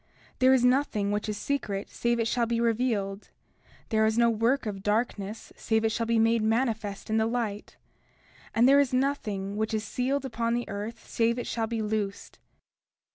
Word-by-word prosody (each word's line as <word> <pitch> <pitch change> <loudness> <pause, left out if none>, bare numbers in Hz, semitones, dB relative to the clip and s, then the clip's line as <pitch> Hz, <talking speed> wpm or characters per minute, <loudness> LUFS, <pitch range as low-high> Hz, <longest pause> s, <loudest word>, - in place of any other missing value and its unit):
30:17 - - -40
There 260 0 +6
is 250 -1 +3
nothing 250 -6 +2
which 210 +1 -2
is 210 - -3
secret 210 -7 -3
save 235 0 0
it 230 - +1
shall 235 0 +1
be 230 0 0
revealed; 225 -4 -1 0.6
there 220 -1 +2
is 220 +1 0
no 235 0 +4
work 230 +5 +1
of 200 -2 -4
darkness 210 0 -2
save 220 0 0
it 220 - +2
shall 230 0 -1
be 230 0 +2
made 225 0 +3
manifest 220 -2 -1
in 220 - +2
the 220 0 +2
light; 225 -3 -3 0.8
and 235 +2 +5
there 280 +1 +6
is 265 -3 +2
nothing 210 -8 -1
which 220 +1 -1
is 215 - -1
sealed 260 +5 -1
upon 235 -2 -1
the 240 - -2
earth 210 +3 -6
save 235 +1 +1
it 245 - -3
shall 225 -1 -2
be 225 -1 -2
loosed. 210 -2 -3
225 Hz, 190 wpm, -28 LUFS, 210-240 Hz, 0.8 s, There